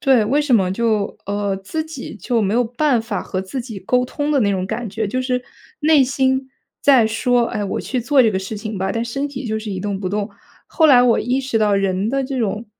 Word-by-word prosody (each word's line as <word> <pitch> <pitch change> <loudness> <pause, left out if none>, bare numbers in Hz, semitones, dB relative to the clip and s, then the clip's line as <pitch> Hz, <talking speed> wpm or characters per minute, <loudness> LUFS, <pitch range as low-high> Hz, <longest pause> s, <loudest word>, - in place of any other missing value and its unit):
对， 255 -5 +4
为 280 +7 +2
什 295 -3 -1
么 185 -3 +1
就 215 -1 0
呃， 200 0 -1
自 255 +12 -4
己 315 -8 -8
就 230 +1 0
没 200 0 0
有 245 +2 +2
办 245 +2 +1
法 220 -4 -4
和 185 - -3
自 190 +8 -5
己 230 -4 -7
沟 250 +7 +1
通 290 +4 -2
的 280 - +3
那 205 -3 +2
种 185 -2 -1
感 220 +1 -4
觉。 215 +2 -2
就 255 +6 -2
是 250 -1 -1 0.4
内 305 -1 +5
心 265 0 0 0.3
在 260 -6 +5
说： 240 +2 +1
“哎， 210 - -3
我 195 - -3
去 255 - -2
做 275 +3 +3
这 235 - +5
个 - - -1
事 190 +3 -4
情 215 0 -5
吧。” 190 +1 -1
但 230 0 -1
身 275 +5 -3
体 265 -2 -6
就 220 -1 -1
是 215 -1 -5
一 190 - -3
动 200 0 -3
不 185 - -2
动， 205 +2 -2 0.4
后 320 -2 +3
来 255 -4 +7
我 245 -2 +3
意 250 +3 0
识 265 -3 -2
到 210 -2 +3
人 195 +1 0
的 270 +2 0
这 260 -1 -3
种 215 +1 -2
230 Hz, 265 characters per minute, -20 LUFS, 205-260 Hz, 0.4 s, 来